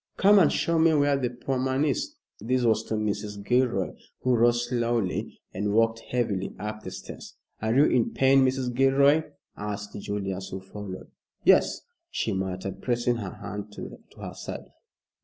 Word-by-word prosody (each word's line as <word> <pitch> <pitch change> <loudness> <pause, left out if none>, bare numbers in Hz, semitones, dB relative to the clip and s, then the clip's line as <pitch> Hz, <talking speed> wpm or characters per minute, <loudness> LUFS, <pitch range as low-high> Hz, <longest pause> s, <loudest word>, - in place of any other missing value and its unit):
"Come 205 +1 +6
and 165 - +5
show 165 -1 +1
me 160 -1 +5
where 145 -1 +3
the 130 -3 0
poor 125 +2 -3
man 130 +3 +1
is." 225 - -1 0.2
This 125 +4 0
was 110 -2 +3
to 110 - -2
Mrs. 105 -1 -3
Gilroy, 120 -6 +2 0.3
who 130 - +2
rose 120 0 +3
slowly 120 -5 -1
and 100 +2 -1
walked 115 0 +3
heavily 110 -6 -2
up 105 0 -5
the 95 - -6
stairs. - - -9 0.3
"Are 110 +1 0
you 140 +3 +6
in 120 -6 +2
pain, 135 0 +4
Mrs. 130 -1 0
Gilroy?" 140 +4 +4 0.3
asked 105 0 -5
Julius, 100 -2 -4
who 95 - -5
followed. 95 0 -9 0.3
"Yes," - - +4 0.3
she - - -1
muttered, 95 0 -4
pressing 120 -1 +1
her 100 -5 -6
hand 105 0 -6
to - - -8 0.2
her - - -6
side. - - -8
115 Hz, 165 wpm, -27 LUFS, 105-130 Hz, 0.3 s, Come